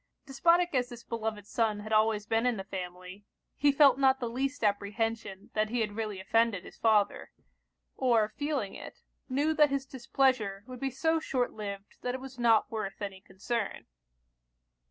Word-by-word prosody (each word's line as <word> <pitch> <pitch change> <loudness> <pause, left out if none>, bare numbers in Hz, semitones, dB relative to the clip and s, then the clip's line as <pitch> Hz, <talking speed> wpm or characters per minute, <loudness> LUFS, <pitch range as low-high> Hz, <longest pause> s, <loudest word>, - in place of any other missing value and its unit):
Despotic 340 +5 +3
as 250 -2 +1
this 240 -1 -10
beloved 220 -3 -4
son 215 -1 0
had 215 +1 -5
always 215 -1 +3
been 225 +3 +1
in 245 -3 +1
the 195 - -4
family, 185 0 -7 0.3
he 290 0 +4
felt 275 -2 +5
not 265 -1 +4
the 245 - -2
least 265 +3 -2
apprehension 205 0 -1
that 215 0 +1
he 240 +1 0
had 210 -2 -2
really 215 -3 -3
offended 220 0 +1
his - - -12
father; 215 -3 +2 0.7
or 235 -5 +3
feeling 285 -9 -2
it, - - -10 0.3
knew 290 +5 +1
that 300 -1 +5
his 275 -1 -1
displeasure 255 -6 0
would 255 0 -9
be 270 - -1
so 320 +5 +1
short 255 -5 -1
liv'd 200 -2 -7
that 250 0 -2
it - - -5
was 265 -1 -10
not 230 -2 +4
worth 215 -3 -4
any 195 -2 -6
concern. 205 +3 -4
225 Hz, 175 wpm, -30 LUFS, 205-265 Hz, 0.7 s, felt